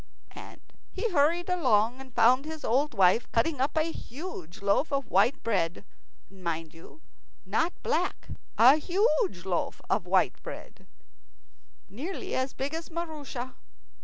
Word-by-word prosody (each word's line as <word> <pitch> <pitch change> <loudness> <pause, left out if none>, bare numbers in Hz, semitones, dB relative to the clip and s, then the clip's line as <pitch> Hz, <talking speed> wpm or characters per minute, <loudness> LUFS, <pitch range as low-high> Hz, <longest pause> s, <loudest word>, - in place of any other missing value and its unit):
And - - -11 0.3
he 465 - -3
hurried 335 +3 +2
along, 255 - +2
and 260 -3 -14
found 250 +4 +5
his 315 -1 -6
old 265 +3 +1
wife 190 +4 +3
cutting 265 +4 +1
up 280 +4 0
a 315 +1 +1
huge 230 - -8
loaf 200 +10 +2
of 275 -3 -2
white 205 +9 +3
bread, 185 -7 -1 0.4
mind 170 -4 -5
you, 165 - -15 0.4
not 335 +2 0
black - - -1 0.3
a 255 +6 +8
huge 310 - +1
loaf 180 -3 -2
of - - 0
white - - +2
bread, - - -10 1.0
nearly 345 - -6
as 260 +1 -1
big 275 +3 -4
as 325 +1 -5
Maroosia. 300 -7 -5
265 Hz, 135 wpm, -28 LUFS, 210-315 Hz, 1.0 s, a